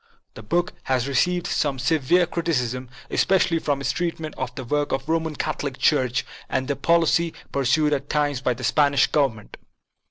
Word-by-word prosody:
The - - -10
book 175 +11 -1
has 130 -1 0
received 175 +6 +1
some 140 -3 0
severe 155 +6 +2
criticism, 130 -8 -2 0.2
especially 180 -3 +2
for 145 -3 -1
its 140 - 0
treatment 165 -3 -3
of 125 -1 -5
the 135 - -5
work 145 +4 -1
of 135 0 -1
the 160 - -2
Roman 160 -2 -1
Catholic 145 -3 -3
Church 130 -4 +2 0.2
and 130 0 -1
the 140 - 0
policy 170 +2 +2 0.2
pur 140 -1 -1
sued 150 +4 +3
at 140 0 -3
times 145 -3 0
by 125 -2 0
the 125 - -9
Spanish 140 +2 +3
Government. 130 -8 -1
145 Hz, 180 wpm, -23 LUFS, 130-160 Hz, 0.2 s, sued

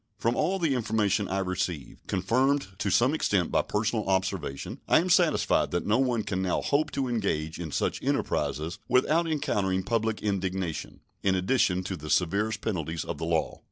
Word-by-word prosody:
From 115 +1 0
all 195 - +1
the 165 -6 +1
information 105 -4 +1
I 95 - -2
receive, 90 -6 -3
confirmed 125 +6 +1
to 105 - 0
some 120 +9 +3
extent 100 - +1
by - - +3
personal 105 -1 -1
observation, 95 -7 -2
I - - +5
am 180 +2 0
satisfied 160 - +3
that - - -2
no 110 +4 +2
one 125 -4 +1
can 95 -2 -2
now 95 -2 0
hope 145 +2 +1
to 135 -2 -1
engage 90 -10 -1
in 80 -3 -5
such - - -1
enterprises 80 +3 -1
without 150 +7 +3
encountering 105 -12 0
public 110 0 -1
indignation, 95 -4 -2 0.2
in 95 -1 +2
addition 95 -2 +2
to 95 0 -3
the 75 -2 -8
severest 100 +7 +1
penalties 80 -6 -3
of - - -5
the 80 - -2
law. 80 -1 -1
100 Hz, 175 wpm, -28 LUFS, 90-120 Hz, 0.2 s, I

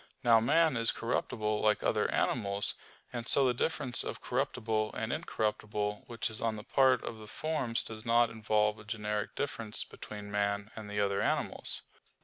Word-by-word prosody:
Now 115 -1 +6
man 155 +4 +3
is 115 0 +5
corruptible 110 -2 -1
like 105 -1 +2
other - - +1
animals. 100 -4 +1 0.4
And 120 -1 -4
so 140 - +4
the 125 - +3
difference 130 -1 +2
of - - -5
corruptible 110 -1 -1
and 110 +1 -2
incorruptible 105 -8 -2
which 115 -1 -2
is 110 - -1
on 115 -1 0
the 105 - -7
part 130 0 +3
of 115 - -6
the 110 - -10
forms 150 -3 -1
does 110 -1 -8
not 115 0 +3
involve 105 -1 +1
a - - -11
generic 105 -1 -3
difference 115 -6 -2
between 105 -1 -9
man 100 0 -1
and 110 -2 -8
the 105 0 -2
other 100 -1 +1
animals. - - -1
110 Hz, 170 wpm, -32 LUFS, 105-120 Hz, 0.4 s, Now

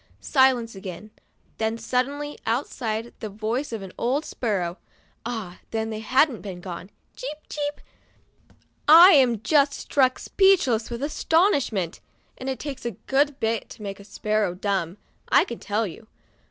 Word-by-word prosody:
Silence 260 -4 +3
again; 195 +1 -8 0.5
then 220 +1 0
suddenly, 275 +5 -2
outside, 230 -2 -2
the 215 - -5
voice 225 +7 -3
of 225 -3 -4
the 190 -1 -9
older 275 +6 0
sparrow 190 -7 -2 0.5
(ah! 215 -7 -5
then 225 0 -2
they 215 - -4
hadn't 255 +3 +2 0.2
gone), 180 +1 -7 0.3
"Cheep, 290 +4 -6
cheep! 290 0 -3 1.1
I 335 +5 +10
am 250 - +4
just 280 +2 +4
struck 260 -2 +2
speechless 350 - +3
with 240 +2 -5
astonishment," 290 - +1 0.4
and 260 - -5
it 265 - -2
takes 285 -3 -6
a 235 -5 -4
good 280 +1 +1
bit 225 -2 -1
to 215 - -11
make 195 -1 -6
a - - -11
sparrow 210 -2 -1
dumb, 190 -2 -2 0.3
I - - +6
can 235 - -7
tell 210 +2 -1
you. 215 +4 -9
230 Hz, 145 wpm, -25 LUFS, 210-275 Hz, 1.1 s, I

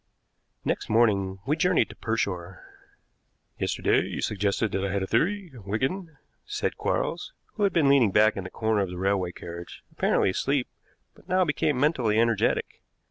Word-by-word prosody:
Next - - -2
morning 100 -4 +2
we 145 +3 +1
journeyed 180 +2 +2
to - - -11
Pershore. 95 -5 -3 1.0
"Yesterday - - +1
you - - -4
suggested 105 +1 0
that 95 - -1
I 100 - -1
had 100 -1 -1
a - - 0
theory, 180 - 0
Wigan," 130 - -3 0.3
said - - -2
Quarles, - - -2 0.2
who 215 - -7
had 200 - +2
been 160 -5 +3
leaning 135 -6 +5
back 105 +3 +4
in 95 - -4
the 95 - -7
corner 110 +1 0
of 95 - -1
the 90 - -7
railway 95 -1 0
carriage 85 0 -9
apparently - - +2
asleep, 135 +5 0 0.5
but - - -22
now 185 0 +3
became 150 -3 0
mentally 125 -7 +2
energetic. 115 -2 +1
110 Hz, 165 wpm, -26 LUFS, 95-150 Hz, 1.0 s, leaning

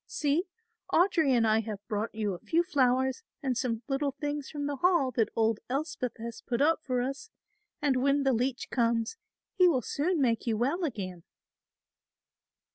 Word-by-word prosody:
See! 300 +5 0 0.5
Audry 340 -4 +3
and 240 -3 +4
I 220 0 +4
have 210 -2 -6
brought 215 +1 -2
you 210 -3 -1
a 175 - -7
few 335 +1 +1
flowers 260 - +2 0.2
and 260 -2 0
some 235 -2 -2
little 275 0 0
things 290 0 -4
from 290 -2 -4
the 285 -1 -2
Hall 340 -4 +3
that 225 -2 +1
old 225 -1 +2
Elspeth 270 -3 -2
has 230 0 -7
put 240 - -2
up 315 +3 +3
for 250 -3 0
us, 275 - -5 0.5
and 275 -3 +3
when 280 +1 +3
the 270 -1 +3
leech 245 +2 -1
comes, 230 - +1 0.4
he 365 -1 +5
will 265 -8 +2
soon 330 - 0
make 240 -3 +1
you 225 -2 +1
well 280 - 0
again." 185 - -5
260 Hz, 175 wpm, -29 LUFS, 230-290 Hz, 0.5 s, he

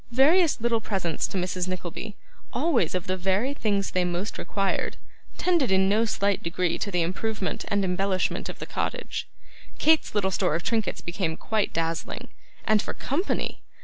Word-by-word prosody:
Various 305 +7 +5
little 230 0 +1
presents 190 -7 -1
to - - -4
Mrs. 180 0 -1
Nickleby, 185 +3 -5 0.4
always 260 - +2
of 180 - -1
the 185 - 0
very 195 +9 +1
things 200 -7 0
they 185 - +2
most 180 +4 -2
required, 195 -2 -1 0.4
tended 340 - +2
in 190 0 +4
no 215 +3 +3
slight 200 -2 +1
degree 170 0 0
to 205 - -1
the 180 -3 +2
improvement 195 +3 -2
and 200 -1 +1
embellishment 185 +1 0
of - - -6
the - - -6
cottage. - - -3 0.5
Kate's 315 -7 +3
little 190 -2 +2
store 155 - +1
of 170 - -2
trinkets 225 -3 0
became 170 -2 -2
quite 215 -2 0
dazzling; 165 0 -2 0.4
and 215 -2 +4
for - - -5
company! 320 +9 -1
195 Hz, 165 wpm, -26 LUFS, 180-225 Hz, 0.5 s, Various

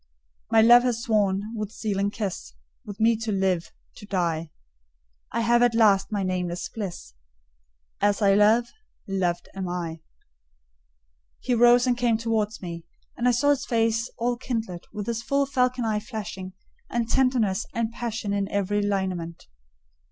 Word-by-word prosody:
My 225 - +5
love 240 +2 +8
has 240 -2 -1
sworn, 205 -4 +1
with 210 -2 -4
sealing 200 -3 -1
kiss, 205 - -5 0.3
With 205 0 -9
me 225 +1 +4
to 220 0 -3
live—to 190 0 -3
die; 170 -4 -1 0.8
I 230 - -1
have 235 +1 +3
at 240 -1 +3
last 205 -4 +4
my 205 -2 -1
nameless 180 -1 -2
bliss. 185 - -7 0.9
As 205 0 +2
I 200 -2 +4
love—loved 205 - 0
am 190 -2 -4
I!" 170 -2 -4 1.4
He 250 - -1
rose 240 +1 +5
and 250 -1 +2
came 240 -2 +1
towards 220 -2 -2
me, 170 -1 -6 0.3
and 245 - 0
I - - +5
saw 275 +4 +3
his 285 - -1
face 225 -2 +1
all 240 +1 0
kindled, 225 -8 -4
and 205 -1 -5
his 230 -1 -2
full 280 +3 +1
falcon 255 -2 0
eye 215 -1 0
flashing, 195 -3 -7 0.4
and 235 -1 -1
tenderness 235 -6 +1
and 230 -1 -2
passion 225 -3 -3
in 200 -1 -1
every 205 +1 0
lineament. 185 -5 -2
215 Hz, 150 wpm, -25 LUFS, 190-235 Hz, 1.4 s, love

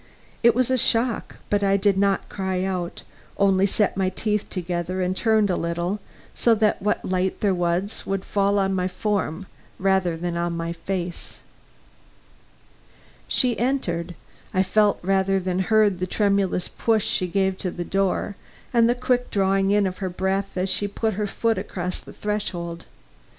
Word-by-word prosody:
It 235 -1 +5
was 255 0 +2
a 260 - +2
shock 230 +1 +1 0.2
but 205 0 +2
I 195 0 +3
did 200 0 +2
not 195 0 +1
cry 190 -2 -2
out 180 -2 -3 0.3
only 195 -1 +4
set 205 +1 +1
my 190 -1 +1
teeth 210 +2 -2
together 180 0 -3
and 185 0 0
turned 215 -2 +2
a - - +1
little 170 +4 -2 0.3
so 230 -1 +3
that 215 -1 +1
what 210 +2 0
light 185 0 -1
there 200 -2 +3
was 175 +3 -1
would 195 -1 -3
fall 200 0 +1
on 195 -1 +1
my 185 -1 0
form 195 -3 -2 0.3
rather 190 -3 +1
than 175 +1 -3
on 170 0 -1
my 165 0 -3
face. 175 +1 -5 1.9
She 245 - +1
entered; 180 -10 -1 0.4
I 190 - +4
felt 205 +2 +3
rather 195 +1 +2
than 185 0 -1
heard 205 -1 +3
the 185 - -1
tremulous 200 -2 +1
push 220 -2 +1
she 185 - 0
gave 190 +1 +1
to 185 - -1
the 175 0 -5
door, 195 +2 0 0.4
and 235 -1 +5
the 240 - +3
quick 250 0 0
drawing 195 -1 +2
in 205 0 +3
of 185 -1 -3
her 190 -2 -2
breath 190 +2 -2
as 185 +1 +1
she 205 - +2
put 220 +2 -1
her 210 +2 -2
foot 225 +2 0
across 180 0 -4
the - - -13
threshold. 175 -5 -3
195 Hz, 170 wpm, -24 LUFS, 180-210 Hz, 1.9 s, It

